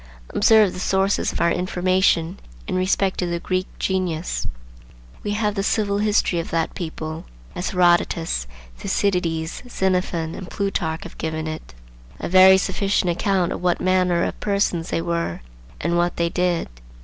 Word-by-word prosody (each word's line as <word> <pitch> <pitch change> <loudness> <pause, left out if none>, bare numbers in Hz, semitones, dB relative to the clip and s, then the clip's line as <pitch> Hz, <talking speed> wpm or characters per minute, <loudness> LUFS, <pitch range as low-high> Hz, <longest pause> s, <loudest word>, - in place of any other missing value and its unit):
Observe 215 -2 +5
the - - -7
sources 195 +1 +1
of - - -5
our 170 - +3
information 180 -1 +1 0.3
in - - -2
respect 185 +1 +1
to 180 - 0
the 170 0 -2
Greek 185 +1 -1
genius. 180 -3 -1 0.7
We 205 - -2
have 210 -1 0
the 200 - -1
civil 200 0 +1
history 205 -4 +2
of 165 - -4
that 165 -1 -1
people, 160 -1 -5 0.3
as 180 - -3
Herodotus, 175 - +2 0.3
Thucydides, 165 - -1
Xenophon, 180 -5 0
and 185 - -8
Plutarch 170 -5 -2
have - - -11
given 160 0 -3
it; 155 - -7 0.4
a - - -3
very 190 +1 +8
sufficient 195 -1 0
account 185 0 +1
of - - -4
what 180 -1 +1
manner 180 -2 +2
of - - -3
persons 200 -5 0
they 165 - -1
were 170 - -2 0.4
and 170 +2 0
what 175 0 +1
they 170 0 0
did. 180 0 0
180 Hz, 155 wpm, -22 LUFS, 170-190 Hz, 0.7 s, very